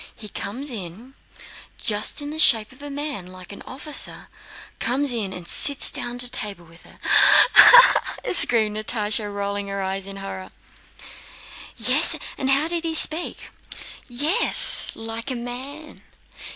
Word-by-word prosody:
He 215 - -9
comes 255 +10 -6
in, 215 +4 -10 0.6
just 215 +7 -1
in 290 - -7
the 315 - -7
shape 220 -7 +3
of 260 +2 -18
a 290 - -8
man, 285 -9 -6
like 185 0 -13
an 200 - -12
officer—comes 275 -1 -5
in 210 -5 -4
and 180 -2 -9
sits 285 -1 +4
down 240 0 -7
to 250 0 +2
table 200 -5 -3
with 165 +1 -20
her." - - -18 0.6
"Ah! - - +8 0.3
ah!" - - -3
screamed 220 - +2
Natásha, 215 -1 -2
rolling 200 0 -5
her 200 0 -6
eyes 190 0 -5
with 195 0 -10
horror. 195 -1 -9 1.3
"Yes? - - +3 0.2
And 265 - -3
how... 275 +3 +1
did 340 0 -1
he 325 -1 -2
speak?" 320 +2 -3 0.6
"Yes, 300 - +3
like 225 +3 -7
a 260 - -4
man. 260 +6 -8
235 Hz, 145 wpm, -21 LUFS, 200-285 Hz, 1.3 s, Ah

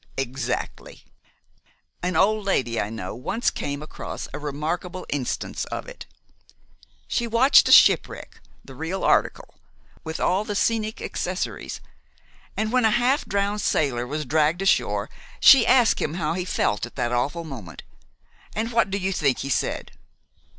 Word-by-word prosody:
"Exactly. 130 -1 -4 1.0
An 180 +1 -2
old 215 +2 +3
lady 125 - 0
I 100 - -3
know 110 -4 -6
once 175 - -1
came 145 +1 -4
across 155 - -7
a 145 - -5
remarkable 160 +5 -4
instance 135 -4 -3
of - - -6
it. - - -10 1.0
She 235 - -1
watched 235 +5 +5
a - - +3
ship - - +7
wreck, - - -11 0.2
the 135 - -11
real 160 +8 -4
article, - - 0 0.4
with 160 0 -5
all 190 +3 +1
the 210 -1 -4
scenic 220 +1 -1
accessories, - - -4 0.8
and 220 0 -1
when 255 -1 +2
a - - +5
half 245 +6 +2
drowned 200 +1 -1
sailor 125 -8 0
was 150 +3 -4
dragged 155 +4 +1
ashore 195 - +1 0.3
she 255 -4 +7
asked 245 -2 +4
him 155 - -2
how 165 -3 -1
he 180 +1 -3
felt 105 - -1
at - - -18
that 120 - -1
awful 140 +8 -1
moment. 120 - -9 0.7
And 225 +2 -2
what 230 -4 +2
do 195 - -1
you 190 0 -1
think 140 -7 0
he - - -4
said?" - - -2
170 Hz, 155 wpm, -24 LUFS, 135-215 Hz, 1.0 s, ship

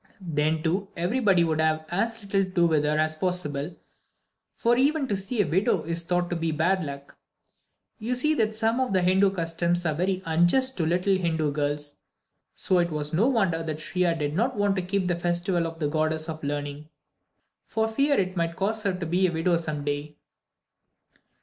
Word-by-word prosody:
Then, 155 -3 -1
too, 185 +5 0
everybody 190 0 +2
would 160 -1 +1
have 155 0 +1
as 225 +5 -1
little 195 0 +1
to 185 - -5
do 175 -2 +2
with 155 -3 +2
her 150 +1 +1
as 155 0 +1
possible; 165 -3 -3 0.8
for 235 +1 +2
even 280 +2 +2
to 205 - 0
see 200 +3 0
a - - -4
widow 185 +1 +1
is 170 +1 -3
thought 175 +1 0
to - - 0
be 165 -1 -1
bad 175 +4 +1
luck. 140 -1 -8 0.8
You 235 +3 -2
see 300 +5 +2
that 220 -6 0
some 225 +2 +1
of 260 -6 0
the 185 -1 +3
Hindu 190 +2 +4
customs 170 -1 -1
are 155 - +1
very 185 +4 -1
unjust 175 +12 +3
to 170 - 0
the - - 0
little 185 +3 +2
Hindu 160 -4 0
girls. 145 0 -3 0.6
So 185 - +2
it 170 0 +1
was 150 -1 -3
no 200 +9 +3
wonder 195 -11 +1
that 155 -2 -4
Shriya 170 +1 0
did 145 -1 -2
not 240 +9 0
want 205 -1 +2
to - - +1
keep 185 +1 -1
the 175 -1 -1
festival 175 0 0
of 165 0 -8
the 155 -2 -1
Goddess 155 +1 0
of 160 -1 -6
Learning, 145 +1 -4 0.8
for 220 0 0
fear 275 +6 +2
it 185 -1 -1
might 170 -1 -1
cause 215 +4 -1
her 200 -3 0
to 180 -2 -4
be 180 +3 +2
a - - -2
widow 170 +2 +1
some 155 -3 -4
day. 145 +1 -3
175 Hz, 200 wpm, -26 LUFS, 155-195 Hz, 0.8 s, Hindu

